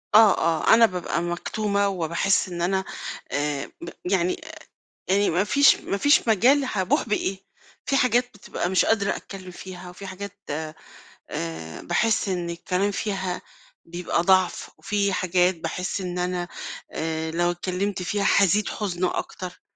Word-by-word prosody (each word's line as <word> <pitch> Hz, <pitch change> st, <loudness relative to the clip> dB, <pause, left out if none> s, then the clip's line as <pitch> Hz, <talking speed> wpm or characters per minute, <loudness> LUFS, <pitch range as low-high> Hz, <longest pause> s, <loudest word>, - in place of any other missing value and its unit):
آه، 215 Hz, -3 st, +8 dB
آه، 165 Hz, +2 st, +3 dB
أنا 230 Hz, +1 st, +8 dB
بابقى 180 Hz, -4 st, -2 dB
مكتومة، 200 Hz, +4 st, 0 dB
وباحس 185 Hz, +1 st, +1 dB
إن 175 Hz, -1 st, -5 dB
أنا 190 Hz, +2 st, +1 dB, 0.5 s
آآ، 145 Hz, -1 st, -2 dB
ب 170 Hz, -, -6 dB, 0.2 s
يعني 180 Hz, -1 st, +2 dB, 0.6 s
آآ، -, -, -6 dB
يعني 200 Hz, +1 st, +3 dB
ما 180 Hz, +4 st, +2 dB
فيش 280 Hz, +6 st, +5 dB
ما 200 Hz, -, -3 dB
فيش 285 Hz, +3 st, +4 dB
مجال. 250 Hz, +7 st, +5 dB
هابوح 200 Hz, -2 st, 0 dB
بإيه؟ 195 Hz, -2 st, -1 dB, 0.5 s
في 275 Hz, -, +1 dB
حاجات 250 Hz, -2 st, +3 dB
بتبقى 185 Hz, -3 st, -4 dB
مش 190 Hz, -, +4 dB
قادرة 200 Hz, -3 st, +1 dB
أتكلم 185 Hz, -2 st, -9 dB
فيها، 180 Hz, 0 st, -9 dB
وفي 195 Hz, +3 st, -10 dB
حاجات 200 Hz, +1 st, -7 dB
آآ، 155 Hz, +1 st, -4 dB, 1.1 s
باحس 210 Hz, +4 st, +1 dB
إن 175 Hz, -2 st, -2 dB
الكلام 180 Hz, +3 st, -1 dB
فيها 190 Hz, -3 st, -3 dB, 0.4 s
بيبقى 170 Hz, 0 st, -1 dB
ضَعف، 185 Hz, 0 st, +2 dB
وفي 200 Hz, -2 st, 0 dB
حاجات 185 Hz, 0 st, +2 dB
باحس 180 Hz, +4 st, -3 dB
إن 180 Hz, -1 st, -4 dB
أنا 180 Hz, 0 st, -1 dB, 0.4 s
آآ، 160 Hz, 0 st, -2 dB
لو 175 Hz, +2 st, +1 dB
اتكلمت 185 Hz, +2 st, -2 dB
فيها 200 Hz, +3 st, 0 dB
هازيد 200 Hz, +1 st, +3 dB
حُزن 185 Hz, -4 st, -2 dB
أكتر. 180 Hz, 0 st, -4 dB
185 Hz, 145 wpm, -25 LUFS, 175-200 Hz, 1.1 s, آه